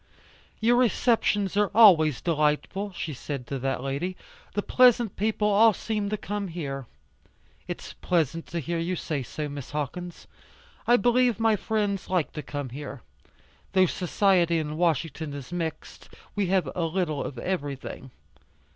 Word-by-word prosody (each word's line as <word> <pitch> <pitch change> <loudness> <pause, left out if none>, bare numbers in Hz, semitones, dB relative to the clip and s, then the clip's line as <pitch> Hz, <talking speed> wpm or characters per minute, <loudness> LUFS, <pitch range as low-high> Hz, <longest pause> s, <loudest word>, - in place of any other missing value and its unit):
"Your 235 +2 +4
receptions 225 -5 +2
are 205 0 +3
always 160 - +7
delightful," 165 +5 0
she 165 -3 -4
said 135 -1 -5
to 135 +2 -4
that 135 0 -2
lady, 145 +7 -3 0.4
"the 205 - 0
pleasant 245 -4 +4
people 210 0 0
all 215 +2 +6
seem 210 0 -2
to 215 - -1
come 205 0 -4
here." 140 -7 -5 0.8
"It's - - -6
pleasant 165 -2 -1
to 170 - -3
hear 170 +3 -2
you 175 +2 -1
say 155 -4 -3
so, 150 +4 -5
Miss 140 -2 -7
Hawkins. 165 +4 -5 0.6
I 240 - +6
believe 245 +1 +3
my 225 -1 +4
friends 205 -2 -1
like 180 -5 0
to 150 - -4
come 145 -1 -5
here. 140 -2 -8 0.7
Though 190 -1 +5
society 180 -1 +2
in 155 -1 -2
Washington 160 -2 -1
is 140 +3 -8
mixed; 165 -2 -5 0.2
we 205 -2 0
have 185 0 +2
a 170 - 0
little 165 -3 -1
of 130 - -6
everything." 140 -4 -4
175 Hz, 150 wpm, -26 LUFS, 150-205 Hz, 0.8 s, always